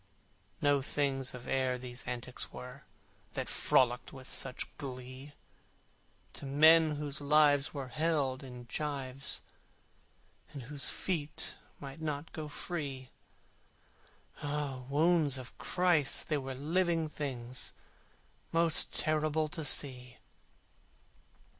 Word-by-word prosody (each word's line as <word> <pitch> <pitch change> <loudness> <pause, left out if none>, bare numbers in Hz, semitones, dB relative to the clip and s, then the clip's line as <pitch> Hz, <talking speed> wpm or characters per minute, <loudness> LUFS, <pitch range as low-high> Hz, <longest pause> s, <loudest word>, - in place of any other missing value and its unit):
No 145 -1 +4
things 135 -2 -1
of 125 - -9
air 130 -1 +1
these 125 0 -4
antics 125 0 -4
were, 125 +2 -9 0.5
That - - -2
frolicked 125 -1 +2
with 130 -1 -10
such 130 -2 0
glee: 130 +1 -7 1.0
To - - -7
men 155 +2 +7
whose 145 0 -3
lives 145 0 +5
were 135 -3 -5
held 145 -2 +1
in 125 -3 -9
gyves, 135 0 -2 1.1
And 140 -3 -6
whose 140 +3 +2
feet 160 -2 -2 0.3
might 140 +2 -8
not 150 0 -3
go 155 -1 -4
free, 145 -4 -4 1.3
Ah! 145 -3 -2
wounds 155 -1 +4
of 130 -1 -9
Christ! 175 -6 +2
they 155 - +2
were 135 -1 -5
living 165 +3 +1
things, 130 -5 -3 0.8
Most 165 -1 +3
terrible 155 0 +1
to 160 +1 -4
see. 125 -3 -1
145 Hz, 110 wpm, -33 LUFS, 130-155 Hz, 1.3 s, men